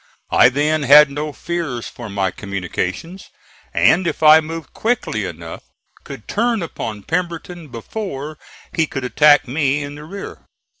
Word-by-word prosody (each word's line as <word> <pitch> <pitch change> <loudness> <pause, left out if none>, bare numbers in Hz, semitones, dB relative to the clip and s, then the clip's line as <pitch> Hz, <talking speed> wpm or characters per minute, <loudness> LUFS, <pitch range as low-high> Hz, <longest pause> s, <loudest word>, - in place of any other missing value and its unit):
I 125 - +6
then 150 +4 +1
had 145 +1 +7
no 150 +2 -3
fears 150 -7 -4
for 120 -3 -9
my 95 -2 -1
communications, 100 - -5 0.4
and 160 - +3
if 160 0 -3
I 155 +1 +9
moved 160 +1 -7
quickly 220 - -1
enough 85 -2 -8 0.4
could 105 - -10
turn 230 -2 0
upon 110 -10 -6
Pemberton 170 - -4
before 145 - -6 0.3
he 160 -1 +1
could 135 - -5
attack 145 +3 +4
me 145 +1 0
in 145 0 -7
the 145 +1 -10
rear. 195 +6 -8
150 Hz, 145 wpm, -19 LUFS, 120-165 Hz, 0.4 s, I